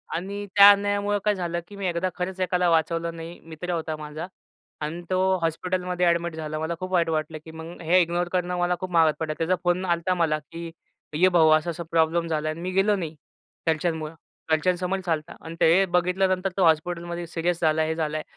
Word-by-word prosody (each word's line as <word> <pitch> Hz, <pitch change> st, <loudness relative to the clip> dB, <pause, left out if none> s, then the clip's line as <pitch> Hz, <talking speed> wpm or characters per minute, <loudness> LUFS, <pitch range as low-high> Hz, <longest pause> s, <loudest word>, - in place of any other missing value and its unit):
आणि 200 Hz, +4 st, -4 dB
त्या 200 Hz, 0 st, +10 dB
अन्यायामुळं 205 Hz, 0 st, +1 dB
काय 210 Hz, -1 st, +3 dB
झालं 170 Hz, -2 st, -2 dB
की 205 Hz, -, -12 dB
मी 195 Hz, -2 st, -3 dB
एकदा 175 Hz, +2 st, -1 dB
खरंच 185 Hz, +1 st, -4 dB
एकाला 180 Hz, -1 st, +2 dB
वाचवलं 165 Hz, +1 st, +1 dB
नाही. 165 Hz, +1 st, -8 dB
मित्र 165 Hz, +2 st, -7 dB
होता 160 Hz, -1 st, -2 dB
माझा 155 Hz, +3 st, -6 dB, 0.5 s
अन 160 Hz, +3 st, -4 dB
तो 185 Hz, -, +1 dB, 0.2 s
हॉस्पिटलमध्ये 180 Hz, +2 st, -1 dB
अ‍ॅडमिट 170 Hz, -1 st, +1 dB
झाला. 155 Hz, -1 st, -4 dB
मला 160 Hz, +2 st, -2 dB
खूप 185 Hz, 0 st, -5 dB
वाईट 170 Hz, -3 st, +2 dB
वाटलं 155 Hz, 0 st, -2 dB
की 160 Hz, -, -10 dB
मग 160 Hz, +2 st, -9 dB
हे 180 Hz, +3 st, +4 dB
इग्नोर 175 Hz, +1 st, 0 dB
करणं 180 Hz, 0 st, 0 dB
मला 175 Hz, 0 st, +1 dB
खूप 185 Hz, -1 st, -5 dB
महागात 165 Hz, -3 st, +4 dB
पडला. 155 Hz, -2 st, -2 dB
त्याचा 170 Hz, +3 st, +1 dB
फोन 180 Hz, +1 st, +1 dB
आला 175 Hz, -, +3 dB
होता 170 Hz, +2 st, -1 dB
मला 155 Hz, -3 st, +1 dB
की 165 Hz, +3 st, -9 dB, 0.4 s
"ये 185 Hz, +4 st, +5 dB
भाऊ, 165 Hz, -3 st, +5 dB
असा-असा 170 Hz, +2 st, -4 dB
प्रॉब्लेम 165 Hz, +1 st, +2 dB
झाला." 155 Hz, -1 st, -1 dB
आणि 160 Hz, +2 st, -5 dB
मी 185 Hz, +1 st, -3 dB
गेलो 195 Hz, +2 st, +3 dB
नाही 165 Hz, -4 st, -5 dB, 0.5 s
घरच्यांमुळं. 160 Hz, 0 st, -1 dB, 0.4 s
घरच्यांसमोरच 180 Hz, +3 st, 0 dB
आला 160 Hz, -, +2 dB
होता. -, -, -11 dB
आणि 165 Hz, +1 st, -7 dB
ते 180 Hz, +4 st, +5 dB
बघितल्यानंतर 185 Hz, +1 st, +1 dB
तो 190 Hz, -, +3 dB
हॉस्पिटलमध्ये 170 Hz, +2 st, 0 dB
सीरियस 170 Hz, +1 st, -1 dB
झाला, 160 Hz, 0 st, +3 dB
हे 160 Hz, 0 st, -1 dB
झालं 155 Hz, -1 st, -2 dB
आहे. 155 Hz, -, -4 dB
170 Hz, 205 wpm, -25 LUFS, 160-180 Hz, 0.5 s, त्या